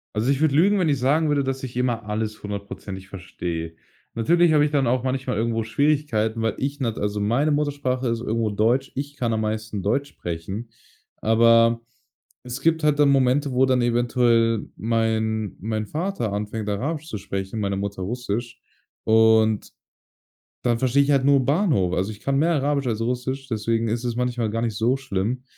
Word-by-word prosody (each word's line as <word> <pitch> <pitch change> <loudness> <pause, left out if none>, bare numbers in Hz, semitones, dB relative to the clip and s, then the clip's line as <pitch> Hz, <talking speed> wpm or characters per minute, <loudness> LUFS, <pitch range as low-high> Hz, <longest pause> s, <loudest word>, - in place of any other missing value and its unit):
Also, 110 +4 0
ich 140 +1 +1
würde 155 -3 +3
lügen, 195 +8 +4
wenn 180 -5 +2
ich 140 -3 +1
sagen 150 +5 +2
würde, 145 -1 +2
dass 135 0 -3
ich 130 -2 -6
immer 120 -3 -1
alles 105 0 -3
hundertprozentig 100 -1 -7
verstehe. 85 -3 -5 0.4
Natürlich 170 +8 +3
habe 150 -1 +5
ich 150 - +2
dann 145 -2 +1
auch 125 +1 +1
manchmal 130 -3 -2
irgendwo 115 0 0
Schwierigkeiten, 115 -3 0
weil 110 -2 +1
ich 140 +2 -3
nat 115 -5 -2
also 105 0 -1
meine 120 +9 +1
Muttersprache 140 -4 -1
ist 115 0 -1
irgendwo 115 -2 -1
Deutsch. 120 +6 +1
Ich 145 +1 -5
kann 120 -4 -1
am 110 - 0
meisten 110 -1 -3
Deutsch 135 +9 0
sprechen. 90 +7 -6 0.5
Aber 115 +1 +4 0.6
es 125 +1 -7
gibt 160 +1 +2
halt 150 -1 +3
dann 145 -1 +5
Momente, 135 +1 +2
wo 130 +1 +3
dann 130 -1 +2
eventuell 120 -2 +2
mein 110 -2 -1
mein 110 +2 -2
Vater 155 - -3
anfängt, 105 +1 -4
Arabisch 145 +10 -3
zu 105 - -4
sprechen, 95 +2 -4
meine 100 -2 -1
Mutter 100 -1 -4
Russisch, 120 +3 -4 0.4
und 110 -1 +3 0.9
dann 120 -2 +1
verstehe 130 +3 +3
ich 140 - +1
halt 135 -2 +2
nur 140 -1 +4
Bahnhof. 140 - +2
Also, 95 +3 -1
ich 105 -1 -10
kann 135 +3 0
mehr 165 +4 +3
Arabisch 140 -1 0
als 115 -3 -1
Russisch, 125 +3 -3
deswegen 115 0 -1
ist 115 +2 -2
es 120 -1 -2
manchmal 120 -2 -1
gar 115 +2 -2
nicht 115 -3 -2
so 120 +5 +1
schlimm. 125 0 -3
120 Hz, 185 wpm, -23 LUFS, 110-135 Hz, 0.9 s, habe